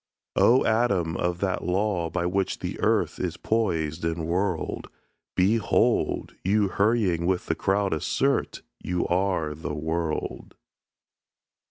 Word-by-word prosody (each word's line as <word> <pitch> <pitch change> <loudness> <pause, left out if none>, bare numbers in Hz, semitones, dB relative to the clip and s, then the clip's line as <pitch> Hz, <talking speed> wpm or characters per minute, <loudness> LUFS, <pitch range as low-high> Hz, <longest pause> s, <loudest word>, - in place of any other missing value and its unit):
"O 125 +3 +5
atom 100 -8 +1
of 90 0 -1
that 95 -2 -1
law, 90 -2 0
by 85 +1 -2
which 95 +2 0
the - - -5
earth - - +1
Is 90 -1 -2
poised 85 -8 -1
and 80 0 -1
whirled; 90 0 -2 0.5
Behold! 105 +5 +2
you 100 +1 +2
hurrying 100 -5 +1
with 90 -1 0
the - - 0
crowd 100 -1 0
assert 80 - 0 0.2
You 90 -1 -1
are 90 -4 0
the 75 0 -5
world." 80 +1 -3
90 Hz, 125 wpm, -26 LUFS, 85-100 Hz, 0.5 s, O